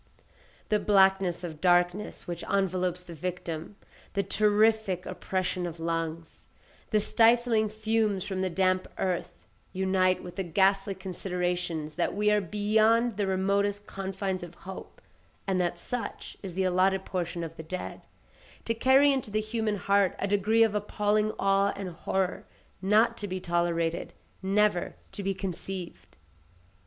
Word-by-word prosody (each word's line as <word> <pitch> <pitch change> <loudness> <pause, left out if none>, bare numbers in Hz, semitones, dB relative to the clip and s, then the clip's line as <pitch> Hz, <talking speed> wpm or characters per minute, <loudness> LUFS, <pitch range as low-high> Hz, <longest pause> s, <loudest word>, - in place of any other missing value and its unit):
The 210 -2 +3
blackness 190 -3 +3
of 160 -3 -6
darkness 180 +2 +2
which 175 -1 -5
envelops 185 -2 0
the 175 - -10
victim, 170 +1 -5 0.4
the 200 - +1
terrific 210 -1 +2
oppression 185 -1 -2
of 165 -1 -8
lungs, 165 0 -4 0.4
the 215 - +3
stifling 225 0 +3
fumes 215 -2 0
from 190 -2 -3
the 190 - 0
damp 185 +1 +1
earth, 185 -2 -3 0.3
unite 185 -1 +2
with 180 +1 -9
the 195 - 0
ghastly 195 +3 +2
considerations 180 -4 -3
that - - 0
we 210 +1 +2
are 210 0 +3
beyond 215 +4 +2
the 205 -2 0
remotest 200 +2 0
confines 190 -1 -3
of 175 -1 -9
hope, 190 0 -9 0.4
and 190 -2 +1
that 175 0 -1
such 245 +7 -5
is 185 -4 -7
the 190 - +1
allotted 185 +1 +2
portion 175 -2 -3
of 165 0 -6
the - - -7
dead, 180 +3 -6 0.6
to 230 - +1
carry 265 +4 +5
into 265 -5 -2
the 215 +1 0
human 215 0 -1
heart 200 0 +2
a 200 - -1
degree 210 +3 +3
of 220 -2 +2
appalling 210 +1 +1
awe 195 0 +2
and 195 -2 -5
horror 185 +2 -2 0.3
not 220 +4 +3
to 205 - -4
be 185 -1 -3
tolerated—never 175 +3 -1 0.2
to - - -6
be 195 0 -1
conceived. 190 -1 -6
190 Hz, 145 wpm, -28 LUFS, 180-210 Hz, 0.6 s, carry